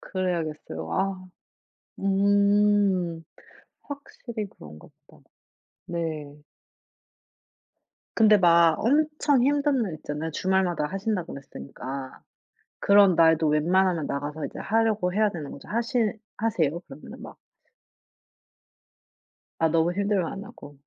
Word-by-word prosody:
그래야겠어요. 155 - -4
아. 185 - -2 0.7
음. 200 -3 +2 0.6
확실히 245 -6 -7
그런가 75 - -14 0.2
보다. - - -21 0.6
네. 170 - -4 2.2
근데 215 -2 +6
막 170 -3 +5
엄청 295 +1 +2
힘든 285 -2 +2
날 185 -7 -3
있잖아요. 150 +1 -5
주말마다 180 -2 0
하신다고 195 0 -3
그랬으니까. 130 - -8 0.6
그런 200 -2 +6
날도 160 -1 +4
웬만하면 170 +2 +2
나가서 145 +2 -4
이제 - - -10
하려고 215 -4 +1
해야 215 0 +3
되는 155 -7 -7
거죠. 140 - -11
하시 235 +4 -1 0.4
하세요? 170 -8 0
그러면은 150 -4 -12
막 - - -10 2.2
아 165 - +3
너무 165 +2 +2
힘들면 200 -2 0
안 195 - -7
하고. 145 -7 -13
185 Hz, 240 characters per minute, -25 LUFS, 160-205 Hz, 2.2 s, 근데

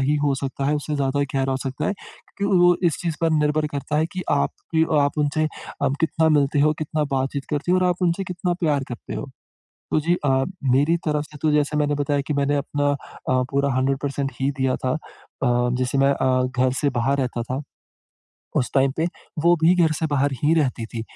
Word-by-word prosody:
ही 145 +3 +2
हो 140 -1 +2
सकता 135 0 -4
है, 150 - +2
उससे 150 +1 -3
ज़्यादा 140 0 0
गहरा 135 0 +1
हो - - 0
सकता 135 -1 -3
है। - - +1 0.5
क्योंकि 200 -1 +2
वो 175 0 +5
इस 160 - +1
चीज़ 165 -3 -2
पर 165 -1 +2
निर्भर 150 0 +2
करता 145 +1 -2
है 160 - +2
कि 185 - -3
आप 70 - +2 0.2
कि 160 0 +5 0.2
आप 145 +2 0
उनसे 150 +1 +1 0.4
अम, 140 -1 +2
कितना 160 0 +2
मिलते 145 -1 +3
हो, 150 +1 +4
कितना 155 0 -1
बातचीत 135 +1 -2
करते 150 +4 0
हो 185 - +4
और 185 - +2
आप 180 +1 -1
उनसे 180 +2 +1
कितना 180 0 -2
प्यार 145 -5 +1
करते 120 - -7
हो। - - -5 0.6
तो - - +4
जी 170 +3 +2
अ, 135 -1 +3 0.3
मेरी 145 +6 +3
तरफ 150 0 0
से 150 - -13
तो 155 - +3
जैसा 150 0 +1
मैंने 145 0 +1
बताया 145 0 0
कि 150 - -1
मैंने 140 0 +1
अपना 145 0 -1
अ, 130 -2 -2
पूरा 140 0 +1
100% 135 +1 -1
ही 135 - +2
दिया 130 -1 +1
था। 130 0 -1
अ, 150 -3 -7 0.3
जैसे 130 +2 0
मैं 135 +1 +4
अ, 130 -1 +1 0.2
घर 130 0 +3
से 145 -2 +2
बाहर 130 +3 0
रहता 125 -2 -1
था, 130 +3 -3 1.0
उस 125 - +1
टाइम 135 0 +3
पे 160 - +1 0.4
वो 175 0 +6
भी 170 +3 +6
घर 160 - +3
से 160 - 0
बाहर 145 -1 +1
ही 155 - +4
रहती 130 -6 0
थी। 115 - -5
145 Hz, 220 wpm, -23 LUFS, 135-155 Hz, 1.0 s, वो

